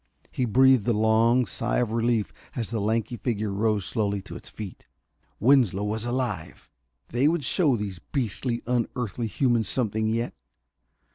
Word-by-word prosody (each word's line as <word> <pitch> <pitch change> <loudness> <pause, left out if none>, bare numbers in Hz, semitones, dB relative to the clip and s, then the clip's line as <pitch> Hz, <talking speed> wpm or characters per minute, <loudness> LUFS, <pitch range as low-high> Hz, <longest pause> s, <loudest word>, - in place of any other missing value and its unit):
He 125 - -1
breathed 130 -1 +4
a 120 - +3
long 110 +3 +3
sigh - - -2
of 120 -3 0
relief 115 -2 0 0.2
as 115 -3 -3
the 115 -3 -1
lanky 115 +3 -1
figure 110 -2 -2
rose 105 -1 0
slowly 100 -1 -1
to 105 - -9
its - - -10
feet. 105 -4 -9 0.5
Winslow 115 -6 +4
was 110 +2 -1
alive! 120 -9 -4 0.4
They 125 +5 +2
would 165 -1 +1
show 150 -5 +3
these 100 -4 -5
beastly, 120 - -3
unearthly 120 -2 -2
humans 115 -2 +1
something 110 -3 0
yet. 115 +2 -1
115 Hz, 150 wpm, -26 LUFS, 105-125 Hz, 0.5 s, breathed